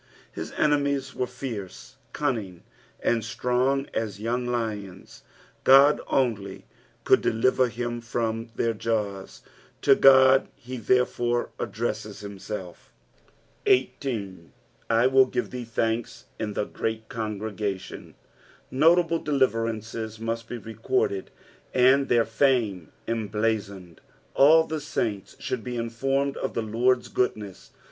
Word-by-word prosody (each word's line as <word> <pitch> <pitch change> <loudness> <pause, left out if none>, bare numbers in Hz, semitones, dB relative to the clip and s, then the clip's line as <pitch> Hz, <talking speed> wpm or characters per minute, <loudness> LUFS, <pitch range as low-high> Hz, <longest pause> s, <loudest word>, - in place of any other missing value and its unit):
His - - -6
enemies 140 -2 +1
were 125 - -2
licrcc, 105 - -7 0.2
cunning, 110 - -3 0.4
and 115 -2 +1
strong 125 +4 0
aa 115 - +1
young 115 +4 -3
lions; 110 -6 -4 0.4
God 140 +2 +7
only 105 -7 -1 0.4
could - - +4
deliver 130 +3 +2
him 120 0 -4
from 115 -1 -2
their 115 -1 0
jaws, 105 -3 -3 0.4
to - - +7
God 130 0 +6
he 125 +2 -8
therefore 120 0 +1
addresaes - - -4
himself. 100 -2 -8 0.8
18. 120 - 0 0.2
"/ - - -36
teiU 130 +3 +4
give - - -2
thee 125 -1 -5
thanke 115 0 -1 0.3
in 105 -2 -3
the 105 - -1
great 110 +1 -4
oongregatitm." 105 -3 -5 0.6
Notable 165 +4 +4
deliver 130 -6 +1
ancea 110 0 -5
must 115 0 -4
bo - - -4
recorded, 385 - -2 0.5
and 130 +2 +4
their 120 -1 +4
fame 115 - +1 0.2
emblazoned. 105 -5 -2 0.3
All 160 +4 +6
the 160 -1 -4
saints 110 -9 -3
should 125 -4 -4
be 125 +1 -4
informed 135 +4 -1
of - - -4
the 115 - -1
Lord's 120 +3 +1
goodness. 105 -6 -3
115 Hz, 115 wpm, -26 LUFS, 110-130 Hz, 0.8 s, God